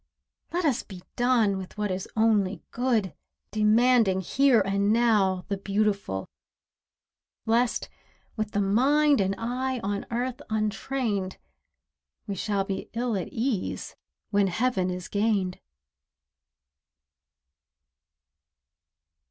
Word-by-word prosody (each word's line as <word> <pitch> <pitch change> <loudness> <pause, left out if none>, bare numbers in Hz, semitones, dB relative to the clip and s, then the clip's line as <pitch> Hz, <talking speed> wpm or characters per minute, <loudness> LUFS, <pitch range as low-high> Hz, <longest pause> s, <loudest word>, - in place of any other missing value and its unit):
Let 350 0 -1
us 275 -6 +2
be 185 -2 -11
done 240 -5 +3
with 190 +2 -9
what 210 -2 -1
is 185 +1 -4
only 210 -3 +2
good, 235 -7 0 0.4
Demanding 215 -1 +4
here 265 +5 +4
and 200 +1 +1
now 210 -5 +2
the 200 -2 -2
beautiful; 200 - -1 1.2
Lest, 230 0 +1 0.5
with 215 -1 -2
the 205 - 0
mind 275 +7 +3
and 195 0 0
eye 255 +3 -2
on 200 +1 -2
earth 250 +3 -2
untrained, 215 -2 -1 0.9
We 200 - -3
shall 195 +1 -1
be 195 0 -5
ill 235 -1 -1
at 185 - -2
ease 230 -4 -3 0.4
when 200 -1 +3
heaven 190 -1 0
is 180 0 -5
gained. 200 -3 0
210 Hz, 105 wpm, -27 LUFS, 195-240 Hz, 1.2 s, Demanding